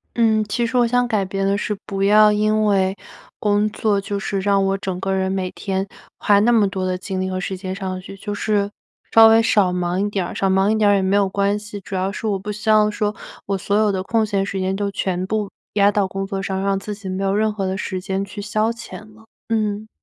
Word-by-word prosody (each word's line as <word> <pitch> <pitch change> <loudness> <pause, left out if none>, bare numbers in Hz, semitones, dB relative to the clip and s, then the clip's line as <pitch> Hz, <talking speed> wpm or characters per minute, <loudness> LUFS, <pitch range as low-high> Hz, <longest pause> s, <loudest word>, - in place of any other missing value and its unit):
嗯， 220 -2 +3
其 235 +3 -1
实 255 - -5
我 245 -1 +4
想 245 +1 +1
改 215 -4 0
变 195 +1 -2
的 200 +1 +1
是 210 0 -2
不 195 0 -2
要 210 +1 +6
因 215 +1 +2
为 195 -2 +2 0.5
工 210 0 +2
作 210 -1 0
就 200 0 -3
是 195 0 -2
让 200 0 +2
我 195 0 +1
整 190 -2 -4
个 195 0 -1
人 190 0 0
每 185 -1 -2
天 195 0 -3 0.3
花 205 -1 +4
那 235 - +4
么 220 -4 +4
多 190 -1 -3
的 185 0 -1
精 185 0 -4
力 185 - -2
和 185 - -3
时 190 0 -3
间 185 0 -5
上 190 -2 -4
去。 195 +1 -10
就 205 +1 -5
是 205 -1 0 0.4
稍 225 0 +9
微 225 0 +6
少 205 -5 +3
忙 180 +1 -1
一 - - -1
点 195 -3 -2
儿， - - -7
少 195 - +1
忙 190 +1 +3
一 220 - +2
点 215 -1 +3
儿 205 - +5
也 - - +1
没 190 +1 +1
有 200 -1 +3
关 200 +1 +1
系。 210 -1 -8
主 195 - -7
要 190 +1 -1
是 220 - -4
我 200 -2 0
不 205 +2 -6
希 210 +1 -4
望 215 -1 +5
说 210 0 -2 0.3
我 195 0 -1
所 200 +2 -1
有 215 0 +3
的 190 -2 -1
空 225 +2 +1
闲 200 -2 -1
时 195 -1 -4
间 190 +1 -1
都 200 0 -2
全 185 -1 -2
部 210 0 -2 0.2
压 200 -1 +4
到 205 -1 +1
工 195 +1 -4
作 195 -1 -4
上， 190 -1 -2
让 195 0 +1
自 205 +2 -5
己 205 -1 -9
没 185 +1 -3
有 195 - +1
任 215 +1 +1
何 200 -2 -3
的 190 0 -2
时 190 -2 -4
间 195 +1 -2
去 205 +1 -8
消 215 +1 0
遣 235 0 -9 0.2
了， 225 - -18 0.2
嗯。 215 -1 -1
200 Hz, 280 characters per minute, -21 LUFS, 190-210 Hz, 0.5 s, 稍